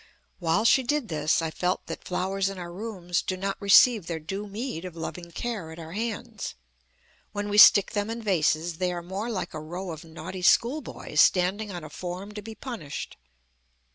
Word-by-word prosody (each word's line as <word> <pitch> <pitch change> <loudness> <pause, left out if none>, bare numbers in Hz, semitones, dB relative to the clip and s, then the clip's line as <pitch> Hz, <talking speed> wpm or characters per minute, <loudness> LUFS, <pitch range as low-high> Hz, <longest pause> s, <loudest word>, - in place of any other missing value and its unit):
While 180 +5 +1
she 265 - +6
did 260 -2 -1
this, 155 +1 +1
I 160 - -2
felt 180 +3 -1
that - - -7
flowers 190 +2 -1
in 195 - -7
our 175 -1 -6
rooms 180 -3 -2
do 185 - -3
not 195 +1 -2
receive 200 0 +6
their 170 - -2
due 195 +7 -5
meed 210 -3 -4
of 180 -2 -7
loving 170 +1 -6
care 200 -4 -4
at 160 - -10
our 165 -1 -8
hands. 220 +3 -4 0.8
When 205 0 -3
we 205 +1 +4
stick 200 -1 +9
them 205 -1 -1
in 230 +1 -3
vases, 165 -3 +1
they 180 -1 +1
are 175 -1 -4
more 195 +6 -4
like 205 -6 -3
a 155 - -5
row 175 +4 -5
of 155 -1 -8
naughty 170 +3 -8
schoolboys 245 +11 +2
standing 195 +3 +3
on 175 -3 -6
a 155 - -8
form 180 +5 -6
to 210 0 -7
be 220 +1 -9
punished. 225 - -6
185 Hz, 195 wpm, -27 LUFS, 170-210 Hz, 0.8 s, stick